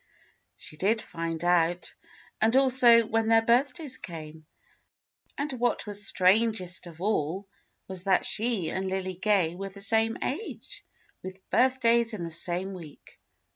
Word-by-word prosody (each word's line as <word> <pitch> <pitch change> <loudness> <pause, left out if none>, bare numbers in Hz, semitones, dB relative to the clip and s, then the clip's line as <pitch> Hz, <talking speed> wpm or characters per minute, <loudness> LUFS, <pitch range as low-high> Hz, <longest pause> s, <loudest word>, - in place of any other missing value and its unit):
She 155 - -9
did 210 +7 +1
find 165 -4 -5
out, 175 0 +1 0.5
and 225 +3 +3
also 250 -3 +6
when 225 0 0
their 225 0 +4
birthdays 260 +3 +1
came. 155 -2 -9 0.9
And 285 -1 -3
what 245 -2 -1
was 205 -1 -3
strangest 185 -2 +1
of 165 0 -13
all 195 -1 -1 0.4
was 190 -1 -5
that 190 -2 +2
she 215 -5 +1
and 190 0 -3
Lily 185 -1 -3
Gay 190 -4 +1
were 195 +2 -6
the 195 +1 -13
same 225 +2 +1
age, 350 +12 -6 0.4
with 185 0 -10
birthdays 235 -3 +2
in 180 - -6
the 165 - -5
same 180 +4 -2
week. 165 -6 -13
195 Hz, 140 wpm, -27 LUFS, 175-230 Hz, 0.9 s, also